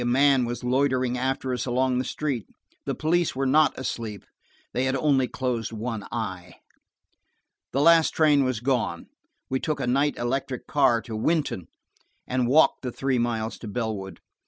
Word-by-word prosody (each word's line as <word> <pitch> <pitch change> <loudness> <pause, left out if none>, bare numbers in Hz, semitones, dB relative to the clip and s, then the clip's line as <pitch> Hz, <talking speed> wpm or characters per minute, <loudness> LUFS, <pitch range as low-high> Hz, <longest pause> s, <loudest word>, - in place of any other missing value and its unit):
A - - -2
man 135 +1 +4
was 120 +1 -5
loitering 130 -1 +1
after 130 0 -1
us 125 - -3
along 125 +1 +1
the - - 0
street. 135 -5 -3 0.4
The - - -1
police 170 0 +1
were 135 +1 -1
not 150 +4 +3
asleep, 115 -5 -5 0.5
they 125 +2 0
had 130 0 0
only 135 -2 +2
closed 125 -4 -2
one 110 -1 -4
eye. 95 -6 -5 1.2
The 135 - +1
last 165 +1 +6
train 150 -3 +3
had 130 -3 -2
gone. 125 -10 -1 0.4
We 130 - -1
took 155 +1 -2
a - - -1
night 140 +4 +1
electric 130 +1 -2
car 130 -6 +2
to 110 - -6
Wynton, 140 - -1 0.6
and 125 -1 0
walked 140 +2 +4
the 125 - -4
three 130 0 0
miles 115 -2 -2
to 115 - -8
Bellwood. 105 -5 -4
130 Hz, 165 wpm, -25 LUFS, 120-135 Hz, 1.2 s, last